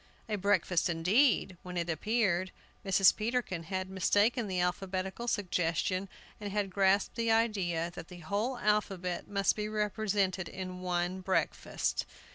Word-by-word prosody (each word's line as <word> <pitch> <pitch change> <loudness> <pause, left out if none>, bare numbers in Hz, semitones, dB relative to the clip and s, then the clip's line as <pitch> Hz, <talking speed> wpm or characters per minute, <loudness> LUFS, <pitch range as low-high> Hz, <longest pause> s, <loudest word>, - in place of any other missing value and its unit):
A 215 - -1
breakfast 190 -3 +2
indeed, 185 - +2
when 180 0 -7
it 170 0 -1
appeared! 185 +1 0 0.3
Mrs. 195 -1 +5
Peterkin 215 -7 -2
had 185 +1 -3
mistaken 205 +5 +2
the 185 -2 -1
alphabetical 190 +4 -2
suggestion, 185 -2 0 0.3
and 205 -1 -5
had 205 -1 -1
grasped 195 +1 +2
the 230 -1 0
idea 195 -7 +1
that 170 - -8
the 180 - -11
whole 210 +9 -1
alphabet 195 -5 0
must 200 -1 +1
be 210 0 -3
represented 205 -3 0
in 185 -1 -6
one 180 0 -1
breakfast. 190 0 -1
190 Hz, 135 wpm, -31 LUFS, 180-210 Hz, 0.3 s, Mrs